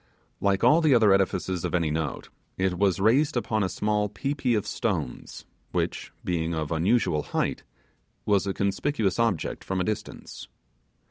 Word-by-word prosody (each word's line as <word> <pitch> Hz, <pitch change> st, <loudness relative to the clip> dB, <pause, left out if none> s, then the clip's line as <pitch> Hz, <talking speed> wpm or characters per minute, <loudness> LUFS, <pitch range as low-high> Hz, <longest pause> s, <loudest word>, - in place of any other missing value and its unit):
Like 100 Hz, 0 st, +1 dB
all 150 Hz, +8 st, +6 dB
the 155 Hz, -5 st, +4 dB
other 110 Hz, -4 st, +5 dB
edifices 95 Hz, -2 st, 0 dB
of -, -, -1 dB
any 85 Hz, -3 st, +1 dB
note, 80 Hz, -2 st, -3 dB, 0.3 s
it 95 Hz, -1 st, 0 dB
was 100 Hz, -2 st, +2 dB
raised 130 Hz, +8 st, +3 dB
upon 110 Hz, -2 st, 0 dB
a 95 Hz, -, 0 dB
small 105 Hz, 0 st, 0 dB
pi 135 Hz, +7 st, -3 dB
pi 140 Hz, -3 st, -2 dB
of 105 Hz, -, -1 dB
stones, 60 Hz, -, -3 dB, 0.3 s
which, -, -, -2 dB
being 85 Hz, -1 st, -1 dB
of 80 Hz, -1 st, -3 dB
unusual 85 Hz, -1 st, +2 dB
height, -, -, -2 dB, 0.6 s
was 100 Hz, -1 st, +2 dB
a 95 Hz, -, 0 dB
conspicuous 100 Hz, +1 st, 0 dB
object 115 Hz, -8 st, 0 dB
from 95 Hz, 0 st, -2 dB
a -, -, +1 dB
distance. 105 Hz, +2 st, -5 dB
100 Hz, 160 wpm, -26 LUFS, 90-115 Hz, 0.6 s, all